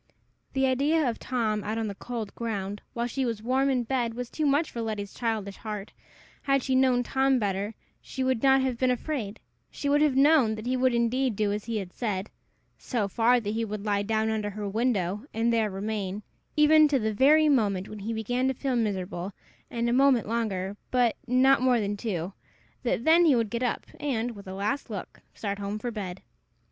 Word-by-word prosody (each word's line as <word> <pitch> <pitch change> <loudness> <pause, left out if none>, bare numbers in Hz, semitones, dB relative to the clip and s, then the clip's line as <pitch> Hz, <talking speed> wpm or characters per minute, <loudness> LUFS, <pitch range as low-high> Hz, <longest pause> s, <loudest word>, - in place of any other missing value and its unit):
The 270 0 +2
idea 280 +4 +2
of 230 - -2
Tom, 220 -4 -1
out 215 +2 -3
on 225 -1 -1
the 200 - -4
cold 225 0 -6
ground, 205 -3 -4
while 235 0 -1
she 265 +2 -2
was 230 -4 -2
warm 265 +3 +2
in 255 -2 +1
bed, 235 -2 -1
was 245 -1 -5
too 310 -2 0
much 290 +3 +2
for 235 - -4
Letty's 210 -3 -4
childish 220 -4 -2
heart. 210 -2 -6 0.5
Had 275 -2 +1
she 265 - -1
known 260 -1 +3
Tom 265 +1 +2
better, 205 -1 -2 0.3
she 265 - -4
would 260 -3 +1
not 270 -1 +5
have 255 -3 -1
been 255 - +3
afraid: 245 -4 -2 0.3
she 285 - -5
would 290 +1 +4
have 300 -3 +3
known 275 -5 +5
that 215 +1 -8
he 255 +1 0
would 255 -1 +2
indeed 240 +1 +1
do 205 0 +1
as 205 0 -3
he 230 -1 -2
had 190 -3 -5
said 205 -4 -3 0.5
so 225 -6 -1
far; 235 +4 +3
that 210 -2 -3
he 230 +1 -1
would 210 -1 -5
lie 205 -1 +1
down 220 +1 0
under 210 -1 -1
her 205 0 -5
window, 210 -2 0
and 230 +1 +2
there 220 -2 +2
remain, 200 0 -4 0.3
even 305 +1 +7
to 285 -2 +2
the 220 -3 -1
very 300 +7 +5
moment 205 -9 +2
when 215 - -8
he 210 +3 -4
began 245 +4 -1
to 265 - 0
feel 265 0 -1
miserable, 195 -4 -2 0.4
and 235 0 -1
a 235 - +1
moment 265 -3 +4
longer, 205 -4 -2
but 245 -3 +2
not 255 +2 +4
more 255 -2 +3
than 205 -1 -1
two; 195 -4 -3 0.5
that 235 -2 -1
then 330 +4 +6
he 295 -5 +5
would 230 -3 0
get 235 0 -2
up, 245 -2 -1
and, 245 -5 -1
with 200 -3 -11
a 190 - -6
last 225 +8 -2
look, 200 -4 -7
start 200 -1 -3
home 200 +1 -3
for 240 +3 -4
bed. 195 -4 -6
230 Hz, 210 wpm, -27 LUFS, 205-260 Hz, 0.5 s, even